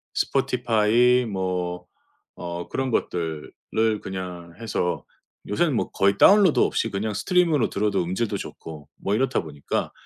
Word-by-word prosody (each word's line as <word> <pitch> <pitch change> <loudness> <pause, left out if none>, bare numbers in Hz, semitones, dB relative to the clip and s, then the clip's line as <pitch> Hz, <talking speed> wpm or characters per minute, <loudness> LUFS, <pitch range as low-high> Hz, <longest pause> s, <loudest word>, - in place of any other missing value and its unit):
Spotify 120 +1 +2
뭐 90 -3 -3 0.5
어 85 0 -5
그런 135 -1 -2
것들을 80 -7 -2 0.5
그냥 90 -3 -6
해서 105 -6 -2 0.4
요새는 155 +9 +1
뭐 - - -1
거의 100 +1 +2
다운로드 200 -5 +6
없이 115 - +1
그냥 105 +2 -2
stream으로 160 - +2
들어도 100 -2 0
음질도 95 +6 -2
좋고 75 -3 -9
뭐 100 - -1
이렇다 130 +3 +1
보니까 75 -3 -4
100 Hz, 330 characters per minute, -24 LUFS, 90-120 Hz, 0.5 s, 다운로드